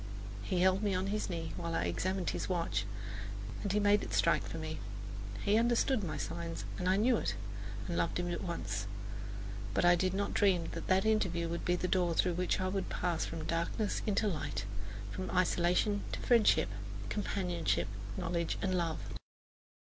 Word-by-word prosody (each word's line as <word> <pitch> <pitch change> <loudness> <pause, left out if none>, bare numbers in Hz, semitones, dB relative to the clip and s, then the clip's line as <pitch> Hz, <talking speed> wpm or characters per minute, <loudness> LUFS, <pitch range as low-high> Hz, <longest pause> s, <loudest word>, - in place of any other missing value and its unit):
He 175 - 0
held 190 +1 +4
me 205 -3 +1
on 185 +1 0
his 215 - -1
knee 165 -2 -3
while 170 -1 -2
I - - +1
examined 185 - 0
his - - -3
watch, 175 -2 0 0.8
and 200 - -1
he 210 - +3
made 205 0 +5
it - - -3
strike 170 - +4
for - - -6
me. 155 0 -4 0.6
He 210 +2 +4
understood 235 0 +3
my 160 - -2
signs, 170 -1 -4
and 180 0 +1
I 190 - +5
knew 230 +4 +4
it - - -1 0.5
and - - -2
loved 85 0 +1
him 175 0 -1
at - - -2
once. 105 - -2 0.9
But - - +3
I 175 - +8
did 185 +1 +1
not 200 +1 0
dream 180 -5 +3
that 165 - -5
that 190 +1 +4
interview 185 -6 +2
would 170 +1 -3
be 175 - +3
the 180 - -1
door 175 -3 +2
through 180 +1 +3
which 180 +1 +1
I 185 0 0
should 195 -1 -1
pass 175 -2 0
from 160 -1 -4
darkness 170 +6 0
into 210 +1 +2
light, 145 - -2 0.5
from 185 - -4
isolation 180 +3 +2
to - - -2
friendship, 230 - +5 0.4
companionship, 180 -5 0 0.3
knowledge, 170 -1 -1
love. 175 -4 0
180 Hz, 180 wpm, -34 LUFS, 170-195 Hz, 0.9 s, I